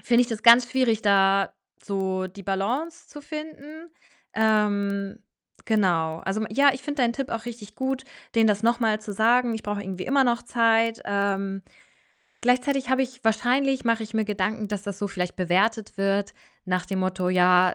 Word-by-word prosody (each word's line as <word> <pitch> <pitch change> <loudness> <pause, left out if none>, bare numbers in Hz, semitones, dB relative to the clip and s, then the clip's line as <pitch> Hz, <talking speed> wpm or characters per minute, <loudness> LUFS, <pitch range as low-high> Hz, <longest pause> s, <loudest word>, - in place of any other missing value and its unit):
finde 240 0 +3
ich 245 - -3
das 225 -2 -5
ganz 240 +1 +7
schwierig, 245 -4 +1
da 195 -1 +3 0.3
so 190 -1 -2
die 195 +2 -12
Balance 245 - -3
zu 295 - -11
finden. 310 +1 -9 0.4
Ähm 205 -1 0 0.5
genau. 170 -7 +1
Also, 195 +3 -2
m 220 - -2
ja, 280 +5 +5
ich 260 - -8
finde 290 -3 -2
deinen 235 -1 +2
Tipp 275 +1 -4
auch 230 0 -4
richtig 225 -3 -9
gut, 265 0 -3 0.3
denen 225 -1 +4
das 210 0 +1
noch 235 +2 +2
mal 215 -2 +1
zu 215 -1 -7
sagen: 235 +3 +2
„Ich 220 - -6
brauche 205 -1 -3
irgendwie 185 -1 -6
immer 270 0 +3
noch 240 -1 +1
Zeit.“ 230 -1 +2
Ähm, 195 -1 -1 0.8
gleichzeitig 255 +2 +1
habe 260 0 +3
ich 255 -1 -6
wahrscheinlich 255 +4 +1
mache 230 -1 +1
ich 220 +1 -13
mir 220 -1 +1
Gedanken, 210 +1 -2
dass 205 -2 -4
das 200 -2 -6
so 205 - -2
vielleicht 180 -2 -4
bewertet 195 +4 0
wird 195 0 0 0.3
nach 180 -1 -1
dem 190 -1 -2
Motto: 185 -1 -1
„Ja” 180 0 +4
220 Hz, 185 wpm, -25 LUFS, 195-245 Hz, 0.8 s, ganz